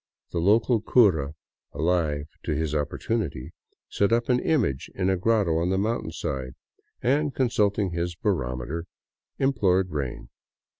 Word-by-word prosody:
The 85 - -1
local 110 +5 +3
cura, 85 - +3 0.4
alive 80 -3 0 0.2
to 75 - 0
his 80 0 -1
opportunity, 75 - -2 0.3
set 100 +1 +1
up 120 +2 +1
an 125 0 +4
image 120 - 0
in 95 0 +1
a - - +2
grotto 95 -4 +2
on 85 +2 0
the 95 - +1
mountainside 80 - -2 0.5
and, 145 +3 +1
consulting 105 -6 +1
his 85 0 -2
barometer, 75 - -2 0.5
implored 95 -9 +2
rain. 65 -5 -4
90 Hz, 130 wpm, -26 LUFS, 75-110 Hz, 0.5 s, an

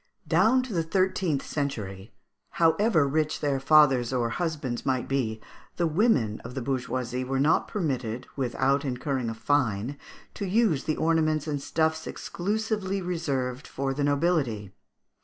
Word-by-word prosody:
Down 220 +11 +4
to 250 -4 -6
the 170 - +1
thirteenth 185 -3 0
century, 105 -9 -4 0.4
however 165 -1 +3
rich 155 +2 0
their 140 -2 0
fathers 135 -4 +5
or 120 -3 0
husbands 150 -6 -2
might 130 -2 0
be, 120 -5 -1 0.4
the 175 - +1
women 155 - +2
of 120 +2 -8
the 135 - -2
bourgeoisie 130 -1 -2
were 130 +1 -1
not 150 +4 +3
permitted, 130 - -2
without 135 +1 +1
incurring 130 -2 -2
a 115 - -4
fine, 130 0 0 0.3
to 200 - -4
use 195 - +2
the 155 - -1
ornaments 155 -2 +1
and 145 -3 -2
stuffs 160 +1 0
exclusively 205 0 -2
reserved 145 -8 -2
for 135 0 -2
the 145 +1 -2
nobility. 140 - 0
145 Hz, 140 wpm, -27 LUFS, 130-165 Hz, 0.4 s, fathers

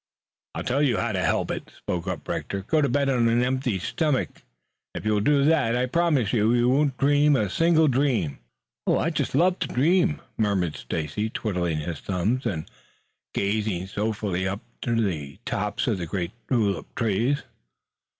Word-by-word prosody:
"I'll - - -3
tell 135 +3 0
you 130 -7 +2
how 115 - 0
to 95 -3 -1
help - - +1
it," - - -6
spoke 90 +1 -4
up 90 -4 -4
Rector. 100 -1 -3
"Go 155 +9 +2
to 140 - +2
bed 140 +2 +1
on 125 -3 +3
an 120 +1 +3
empty 130 -4 0
stomach. 130 - -1 0.5
If - - -5
you 110 - +2
will 105 - +2
do 140 +6 +3
that, 145 -6 +3
I 125 +1 +1
promise 145 - +1
you 110 -2 +3
that 120 - +3
you 120 +1 +3
won't 135 0 +2
dream 145 +1 +4
a 105 -7 0
single 165 - +4
dream." 125 - +1 0.5
"I - - +2
just - - -2
love 180 +2 +3
to - - -1
dream," 165 +4 +2 0.2
murmured 95 -7 +1
Stacy, 80 +8 -3
twiddling 90 -8 -2
his 80 -1 -4
thumbs 100 +8 -1
and 80 -5 -3 0.7
gazing 100 -3 0
soulfully 100 -2 -2
up 100 +3 -3 0.2
to 115 -1 0
the 75 -10 -2
tops - - -1
of - - 0
the 85 - -4
great 90 0 -3 0.2
tulip 100 - 0
trees. 120 +5 +1
115 Hz, 180 wpm, -25 LUFS, 95-140 Hz, 0.7 s, dream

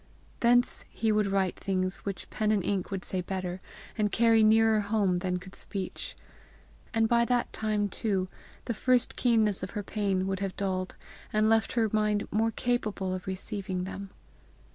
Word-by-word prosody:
Thence 245 +1 +3
he 220 -1 0
would 210 -1 +2
write 195 -2 0
things 185 -1 -1
which 195 -2 -5
pen 215 -1 +1
and 205 -3 +2
ink 195 -3 -1
would 195 -3 -4
say 185 - -2
better 185 0 -4 0.3
and 210 -2 +1
carry 225 -1 +5
nearer 220 0 +5
home 200 -3 +1
than 180 0 -1
could 185 +1 -11
speech; 195 -3 -4 0.7
and 225 0 +2
by 235 +1 +4
that 245 0 0
time 215 -1 0
too 195 -2 -1 0.4
the 235 - -1
first 250 +2 +2
keenness 220 -5 +2
of 185 +3 -5
her 205 - -2
pain 195 -2 0
would 195 -1 -2
have 195 -2 -3
dulled, 185 -2 -2 0.3
and 215 0 +3
left 225 0 +3
her 230 -2 +2
mind 210 -1 +1
more 220 +2 +2
capable 215 -5 -1
of 185 0 -5
receiving 190 -1 -3
them. 195 +1 -6
205 Hz, 170 wpm, -29 LUFS, 190-220 Hz, 0.7 s, carry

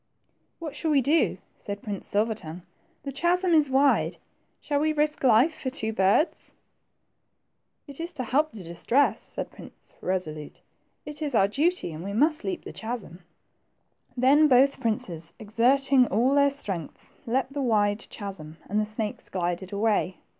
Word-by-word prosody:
What 310 -4 -7
shall 320 - -2
we 290 -3 +4
do? 310 +5 +2
" - - -41
said 200 0 -7
Prince 205 -3 -5
Silver 215 +3 +1
tongue; 175 -4 -9 0.4
the 280 - -4
chasm 345 +5 +1
is 305 -3 +4
wide; 275 +2 +3 0.4
shall 290 -1 -1
we 310 +1 +1
risk 300 0 0
life 255 +6 +5
for 265 - -4
two 220 -5 -3
birds? 200 - +1 0.7
" - - -51
It 280 0 -10
is 335 +1 -4
to 260 - -4
help 295 +6 +1
the 205 -4 -9
distressed," 175 +11 0
said - - -5
Prince - - -14
Kesolute; 155 -5 -4 0.5
it 300 +1 -8
is 290 -5 -2
our 195 - +5
duty, 300 - 0
and 155 +2 -7
we 200 +1 -5
must 305 +8 +2
leap 370 -2 -4
the - - -8
chasm." 220 -7 -6 1.0
Then 280 +5 +5
both 270 +1 +4
princes, 170 -7 -3
exerting 250 +4 +3
all 240 +7 +2
their 280 0 +5
strength, 195 - -5 0.2
leaped 260 +3 0
the 285 - -2
wide 210 -4 +1
chasm, 175 -7 -8
and 210 +2 0
the 215 - 0
snakes 215 0 -5
glided 175 0 -3
away. 205 -3 0
245 Hz, 165 wpm, -26 LUFS, 200-285 Hz, 1.0 s, life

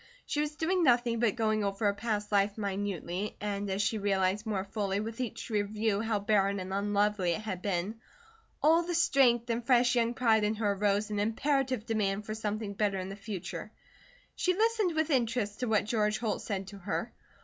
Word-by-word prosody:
She 295 - -1
was 300 0 -3
doing 355 +4 +1
nothing 240 -5 +3
but 235 -2 +2
going 215 -2 +1
over 200 +1 -1
her 200 - +4
past 210 0 -3
life 200 0 +2
minutely, 200 -2 -3
and 205 -1 -3
as 195 +2 0
she 220 +1 0
realized 195 +1 0
more 200 -3 -1
fully 200 -1 -2
with 225 +3 -4
each 245 0 -5
review 210 0 0
how 225 -1 0
barren 200 -1 +2
and 185 +1 -5
unlovely 205 -2 +1
it 215 - -4
had 195 -4 -4
been, 200 +3 -2 0.6
all 325 +3 +6
the 345 0 -3
strength 255 -7 +4
and 235 +1 -1
fresh 245 0 +4
young 235 -1 +1
pride 225 -3 +3
in 210 +1 +1
her 210 -2 +1
arose 205 +1 0
in 205 - -1
imperative 255 +2 0
demand 210 -2 -1
for 215 - -4
something 215 -1 -3
better 200 -1 0
in 185 0 -4
the 195 - -6
future. 200 -3 -6 0.6
She 365 0 +1
listened 435 -4 +2
with 315 0 +1
interest 230 -5 0
to 250 - -1
what 215 -3 +2
George 215 -1 +1
Holt 225 -3 -2
said 195 -2 -3
to 200 0 -10
her. 195 - -3
215 Hz, 195 wpm, -30 LUFS, 200-235 Hz, 0.6 s, all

